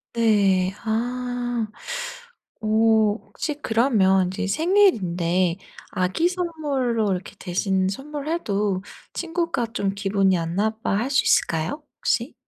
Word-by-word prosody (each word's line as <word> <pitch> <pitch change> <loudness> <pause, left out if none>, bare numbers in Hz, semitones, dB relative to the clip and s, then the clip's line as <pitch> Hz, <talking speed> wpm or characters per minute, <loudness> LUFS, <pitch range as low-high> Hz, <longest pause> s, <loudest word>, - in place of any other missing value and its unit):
네. 200 -5 +3
아. 245 +1 -1 0.9
어 215 - -3
혹시 220 +6 +2
그러면 215 -6 +3
인제 200 +2 -3
생일인데 185 - +2 0.3
아기 185 - +1
선물로 285 - -1
이렇게 185 +2 -4
대신 190 +1 0
선물해도 270 - -2 0.3
친구가 335 -7 -1
좀 200 -5 -1
기분이 195 -2 +2
안 165 0 -3
나빠할 220 +3 0
수 280 - +3
있을까요 165 - +1 0.2
혹시? - - 0
220 Hz, 220 characters per minute, -23 LUFS, 190-265 Hz, 0.9 s, 네